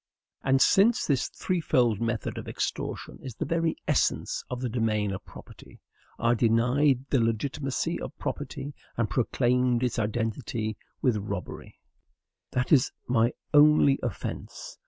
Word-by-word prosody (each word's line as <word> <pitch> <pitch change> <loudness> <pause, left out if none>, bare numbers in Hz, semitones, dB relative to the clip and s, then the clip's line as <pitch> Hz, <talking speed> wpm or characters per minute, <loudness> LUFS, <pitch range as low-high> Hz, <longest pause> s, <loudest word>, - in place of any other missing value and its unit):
And 135 0 +4
since 220 +4 +4
this 140 -4 +1
threefold 125 - +1
method 115 -1 -2
of - - -9
extortion - - -4
is 130 -4 -8
the - - -3
very 165 -1 0
essence - - +1
of 125 - -4
the 125 - -2
domain 110 -3 0
of 95 - -5
property, - - -14 0.4
I 115 +1 +2
denied 125 +4 +2
the 135 - +4
legitimacy 130 +4 -1
of - - -7
property, 145 +1 -5 0.2
and 115 -3 0
proclaimed 125 0 +1
its 125 -1 0
identity 110 0 -2 0.3
with 125 -5 +3
robbery. 100 -4 -6 0.8
That 125 0 -1
is 140 -4 +5 0.2
my 120 -1 +2 0.2
only 150 -2 +6
offence. - - -6
125 Hz, 135 wpm, -27 LUFS, 115-140 Hz, 0.8 s, only